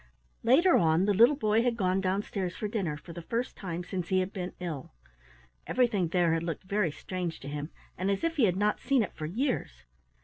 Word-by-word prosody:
Later 310 +10 +5
on 165 +2 +3
the 205 - +3
little 235 +9 +6
boy 215 -4 +2
had 240 -1 0
gone 190 -2 +1
downstairs 190 -1 -2
for 210 - -3
dinner, 190 -8 -2
for 170 +3 -11
the 170 - -7
first 235 +8 -3
time 175 -2 -5
since 180 -1 -4
he 185 - +2
had 185 +2 -2
been 180 -2 -4
ill. 160 - -5 0.7
Everything 220 -8 +2
there 170 -1 +2
had 165 - 0
looked 165 -1 -4
very 195 -1 0
strange 175 +2 -5
to 135 - -8
him, 145 +1 -4 0.3
and 190 +2 0
as 200 -1 0
if 330 -1 0
he 255 - +5
had 185 -2 +1
not 210 +1 +1
seen 270 -4 +2
it - - -6
for 155 - -5
years. 210 - -2
185 Hz, 215 wpm, -29 LUFS, 170-220 Hz, 0.7 s, little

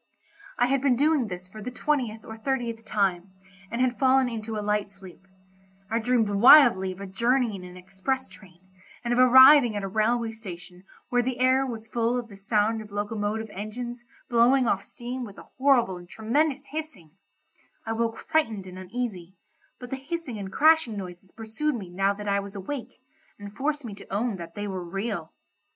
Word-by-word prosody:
I 245 - +4
had 270 +1 +1
been 270 -3 +3
doing 290 -2 +2
this 180 -1 -7
for 215 +4 -11
the 235 - -4
twentieth 250 -4 -2
or 220 - -8
thirtieth 230 -1 -3
time, 195 -3 -1 0.4
and 235 +2 -2
had 255 -1 +1
fallen 265 -1 +4
into 225 -2 -5
a 210 - -4
light 210 -1 0
sleep: 190 -1 -15 0.6
I 230 - +1
dreamed 235 -1 +2
wildly 205 -3 +7
of 185 - -10
a - - -5
journey 235 +4 +1
in 185 - -8
an 180 0 -11
express 195 +8 -3
train, 180 -2 -17 0.4
and 240 0 0
of 245 - +1
arriving 255 -1 +8
at 205 - -3
a - - -2
railway 225 +3 0
station 180 -4 -11 0.2
where 245 0 +2
the 250 0 -2
air 260 +1 +3
was 225 -3 -7
full 235 +2 0
of 240 -1 -5
the 200 - -12
sound 215 +2 0
of 210 -1 -12
locomotive 210 +1 -3
engines 240 +5 -6 0.2
blowing 245 +1 +4
off 195 -3 +1
steam 245 +4 -7
with 205 -4 -9
a - - -12
horrible 250 -9 +3
and 175 0 -13
tremendous 275 - -1
hissing; 290 - -7 0.7
I 225 - -2
woke 230 0 -1
frightened 225 -11 -1
and 185 0 -9
uneasy, 190 -3 -5 0.4
but 250 -1 -10
the 270 - -2
hissing 275 -4 -5
and 190 -1 -6
crashing 310 -7 +4
noises 185 -1 -8
pursued 230 +7 -3
me 190 -6 -7
now 195 +2 +1
that 210 0 -7
I 200 0 +2
was 200 0 -8
awake, 235 +8 -6 0.4
and 205 0 -10
forced 290 0 -2
me 220 - -6
to 200 - -13
own 210 +1 -1
that 170 -1 -9
they 205 0 -4
were 190 -2 -4
real. 195 -2 -4
225 Hz, 190 wpm, -26 LUFS, 195-250 Hz, 0.7 s, arriving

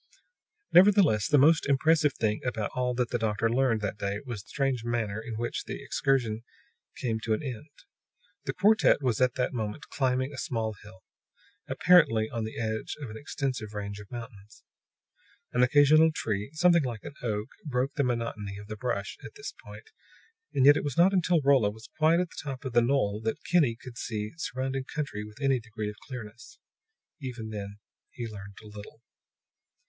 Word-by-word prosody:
Nevertheless, 180 - +6
the 145 - +4
most 155 +3 +5
impressive 150 +1 +3
thing 105 -1 0
about 115 -4 -2
all 125 -1 0
that 125 -1 -1
the 120 - 0
doctor 110 0 0
learned 120 -3 +2
that 105 0 -3
day 100 0 -2
was 115 -6 -5
the - - -26
strange 135 -4 -1
mariner 110 -3 -2
in 115 0 -6
which 120 +2 -3
the - - -5
excursion 120 -5 0 0.6
came 115 -3 -1
to 110 -1 0
an 150 - -6
end. 135 +2 -6 0.8
The 135 - -2
quartet 205 -5 +4
was 125 -2 +1
at 125 -1 +3
that 125 - -1
moment 110 +3 -4
climbing 130 0 0
a 135 - -6
small 110 -2 -2
hill, 105 -2 -14 0.7
apparently 115 -12 +4
on 115 -2 -2
the 110 - -6
edge 110 -1 -3
of 135 -7 -6
an - - -8
extensive 130 -5 -4
range 100 0 -5
of 100 - -12
mountains. 115 -4 -10 0.9
An 125 - +2
occasional 145 +5 +6
tree, 105 -7 -2
something 170 +1 +4
like 120 -5 -4
an - - -8
oak, 110 -1 -2
broke 135 -1 -1
the 140 - +1
monotony 115 -5 -2
of 105 - -9
the 110 +1 -7
brush 105 -4 -3
at - - -10
this - - -7
point, 105 +1 -12 0.6
and 130 - +2
yet 145 +1 +8
it - - -2
was 145 -4 -3
not 180 +3 +5
until 175 -3 +3
Rolla 135 -6 +4
was 110 +2 -11
quite 160 +2 +5
at 180 -1 -1
the - - -7
top 135 -1 -6
of 130 - -4
the 120 - +5
knoll 115 -5 +1
that 110 0 -3
Kinney 150 -10 +3
could 125 -2 -10
see 105 -2 -3
surrounding 130 -2 -3
country 140 -8 -4
with 105 +2 -12
any 135 -2 +2
degree 110 -2 -5
of - - -14
clearness. 120 - -9 0.6
Even 120 -5 -6
then 100 -1 -6 0.3
he 120 - -6
learned 105 -2 -10
little. 105 +2 -11
120 Hz, 185 wpm, -28 LUFS, 110-140 Hz, 0.9 s, yet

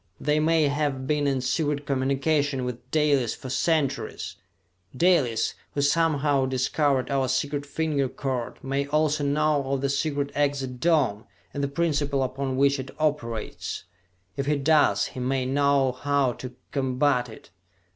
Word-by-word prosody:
They 150 +1 +1
may 160 +1 +3
have 140 -2 -1
been 150 0 +1
in 135 -2 0
secret 145 +3 -1
communication 140 0 0
with 125 0 -6
Dalis 145 -5 +2
for 130 - -8
centuries! 145 -2 -1 0.6
Dalis, 140 -9 +2 0.2
who 145 - +1
somehow 145 -3 +2
discovered 130 +1 +1
our 135 -1 +1
secret 140 +3 -1
finger 145 -3 -1
code, 130 -4 -4
may 140 +1 -1
also 150 0 +1
know 150 +1 +2
of 135 -1 0
the 140 - 0
secret 140 0 -1
exit 140 -3 -1
dome, 130 -10 +2 0.3
and 140 - -3
the - - +1
principle 145 -2 0
upon 130 0 -3
which 140 0 +3
it 130 0 -6
operates! 145 -8 -2 0.5
If 140 0 -3
he 150 - +3
does, 145 +1 +3
he 130 - -7
may 130 +1 0
know 140 0 +2
how 140 0 0
to 125 0 -9 0.2
combat 130 -2 +1
it! 110 - -13
140 Hz, 145 wpm, -26 LUFS, 130-150 Hz, 0.6 s, may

